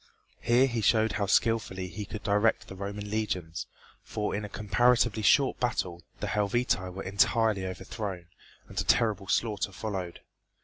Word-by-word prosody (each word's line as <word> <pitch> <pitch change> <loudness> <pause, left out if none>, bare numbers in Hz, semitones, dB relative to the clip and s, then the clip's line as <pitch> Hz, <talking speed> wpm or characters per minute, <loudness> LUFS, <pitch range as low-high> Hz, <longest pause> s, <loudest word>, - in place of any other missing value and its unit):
Here 120 +3 +4
he 120 -4 -1
showed 110 +1 +3
how 105 -1 -1
skilfully 105 -4 +1
he 105 +3 -6
could 105 +1 -7
direct 105 +2 +2
the 95 - -9
Roman 100 +2 -5
legions, 90 -7 -2 0.3
for 105 -1 -3
in 105 - -3
a 105 - -6
comparatively 110 +2 +2
short 135 +5 +4
battle 90 -8 -1 0.2
the - - -1
Helvetii 105 -3 0
were 95 +2 -6
entirely 100 0 +2
overthrown, 95 0 -5 0.4
and - - -2
a - - -2
terrible 105 -4 +2
slaughter 105 -2 0
followed. 95 -4 -5
105 Hz, 150 wpm, -29 LUFS, 95-110 Hz, 0.4 s, Here